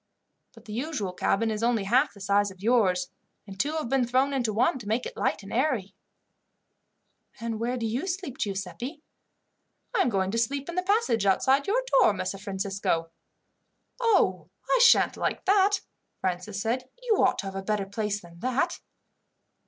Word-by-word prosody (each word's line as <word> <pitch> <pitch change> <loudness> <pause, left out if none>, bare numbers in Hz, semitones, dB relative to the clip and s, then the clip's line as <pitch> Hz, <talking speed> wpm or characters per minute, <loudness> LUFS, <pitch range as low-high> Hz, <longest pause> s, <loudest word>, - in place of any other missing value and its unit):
But 225 0 -16
the 215 - -8
usual 240 - -3
cabin 220 +4 +1
is 215 0 -3
only 230 -3 +2
half 245 +8 +2
the - - -13
size 200 +1 +2
of 190 -1 -14
yours, 195 -7 +2 0.3
and 195 -2 -11
two 295 +6 0
have 315 -5 -2
been 255 -1 +1
thrown 260 +3 +2
into 245 -5 0
one 245 +7 +2
to 220 - -10
make 225 +4 0
it - - -6
light 205 - -1
and 195 - -9
airy." 235 -7 0 1.5
"And 230 -1 -3
where 245 +2 -1
do 235 - -2
you 245 +11 -2
sleep, 355 -8 -4
Giuseppi?" 205 - -4 0.9
"I 450 - +3
am - - +2
going 190 -3 0
to 230 - 0
sleep 275 +4 -1
in - - -4
the 365 - 0
passage 365 - +1
outside 265 +8 +3
your - - +1 0.2
door, - - +5
Messer 195 - -4
Francisco." 195 -4 -2 0.9
"Oh, 190 - +2 0.2
but - - 0
I - - +4
sha'n't 475 -1 +5
like - - -2
that!" 395 0 +4 0.4
Francis 185 +2 -3
said. 245 +4 -2
"You 450 -4 +2
ought - - +3
to - - -4
have 195 0 -6
a 195 - -3
better 205 0 -1
place 205 +1 -3
than 170 -1 -15
that." 255 +5 0
230 Hz, 185 wpm, -27 LUFS, 195-275 Hz, 1.5 s, door